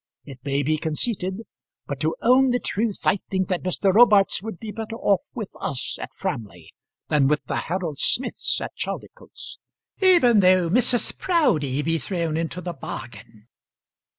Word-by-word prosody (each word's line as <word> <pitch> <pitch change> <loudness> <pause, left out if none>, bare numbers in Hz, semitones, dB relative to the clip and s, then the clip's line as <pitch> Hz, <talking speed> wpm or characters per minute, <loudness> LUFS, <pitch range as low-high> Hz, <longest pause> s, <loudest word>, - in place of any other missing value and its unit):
It 135 -3 -11
may 140 0 0
be 155 +3 +1
conceited; 185 +5 -2 0.4
but - - -5
to - - 0
own 260 +2 +5
the 245 - +2
truth, 215 -2 -2
I - - +3
think 190 -1 -3
that 180 -2 -1
Mr. 185 +1 +1
Robarts 210 -4 +5
would 220 -3 -6
be 220 +2 -7
better 225 +2 -6
off 200 -4 +2
with 215 -6 -5
us 135 - -3
at - - -6
Framley 90 -8 -6 0.4
than 145 -3 +3
with 150 +1 +1
the - - -2
Harold 170 -5 -3
Smiths 260 - +1
at - - -6
Chaldicotes, - - -7 0.4
even 340 - +6
though 185 -3 +4
Mrs. 245 +2 +2
Proudie 160 - +1
be 165 +1 0
thrown 165 +2 -2
into 165 +2 -3
the 175 -1 -5
bargain." 115 -5 -9
185 Hz, 160 wpm, -23 LUFS, 150-225 Hz, 0.4 s, even